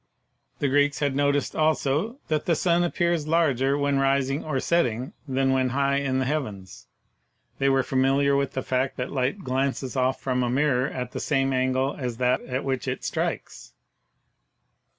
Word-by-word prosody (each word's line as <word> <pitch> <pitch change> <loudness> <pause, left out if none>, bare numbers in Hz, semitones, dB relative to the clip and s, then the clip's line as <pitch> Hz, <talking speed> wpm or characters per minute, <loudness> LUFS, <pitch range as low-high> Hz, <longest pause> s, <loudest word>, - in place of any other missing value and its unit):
The 145 - 0
Greeks 145 0 +2
had 140 -1 0
noticed, 145 0 +1
also, 155 - +1
that 155 -1 -1
the 170 - +3
sun 175 +1 +2
appears 170 -2 0
larger 140 -4 +2
when 140 -1 +1
rising 135 +1 +1
or 145 -4 -2
setting 130 -7 0
than 135 0 +1
when 130 -1 +1
high 140 +2 +1
in 135 -2 0
the 130 - 0
heavens; 110 -11 -4 0.7
they 135 0 +3
were 135 -1 +3
familiar 135 +2 +2
with 140 -1 0
the 130 - -3
fact 130 +1 -1
that 125 - -3
light 140 +9 -1
glances 130 0 -2
off 130 0 +1
from 125 -1 -1
a 120 - 0
mirror 135 0 +2
at 125 -1 -5
the - - -5
same 135 -2 0
angle 130 +1 0
as 125 -3 -3
that 125 +1 +1
at 130 +1 -4
which 130 -2 -2
it - - -3
strikes. - - -4
135 Hz, 170 wpm, -25 LUFS, 130-145 Hz, 0.7 s, the